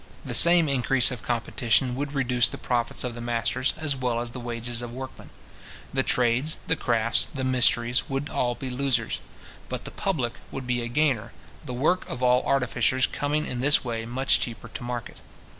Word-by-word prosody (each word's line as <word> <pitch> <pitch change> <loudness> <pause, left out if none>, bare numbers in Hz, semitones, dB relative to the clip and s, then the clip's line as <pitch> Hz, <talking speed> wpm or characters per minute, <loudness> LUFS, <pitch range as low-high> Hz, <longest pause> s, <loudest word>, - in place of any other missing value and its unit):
The - - -4
same 170 -1 +9
increase 135 -1 +3
of 125 -4 -6
competition 120 +1 0
would 145 +2 -4
reduce 125 -3 +2
the - - -7
profits 120 -2 -2
of 125 -1 -4
the 120 - -8
masters, 120 +2 -1
as 155 -3 -1
well 125 -3 -1
as 120 0 -5
the 125 - -8
wages 120 0 -4
of 120 -1 -6
workmen. 130 +2 -9 0.6
The 135 - +2
trades, 125 +4 +1
the - - +1
crafts, 115 -4 0
the 135 -3 -5
mysteries, 125 -1 +2
would 135 +1 -3
all 120 -1 -1
be 130 +2 -6
losers. 125 -3 -1 0.5
But - - -5
the - - -7
public 135 -12 -2 0.2
would 135 - -7
be 125 -1 -1
a 120 - -4
gainer, 130 -4 0 0.3
the 125 - -6
work 155 +8 0
of 130 - -5
all 125 0 +4
artificers 130 -1 +1
coming 150 +1 -2
in 125 - -5
this 145 +4 +3
way 115 -2 -4
much 130 +3 +2
cheaper 120 0 -6
to 120 - -8
market. 120 -1 -6
125 Hz, 190 wpm, -25 LUFS, 120-135 Hz, 0.6 s, same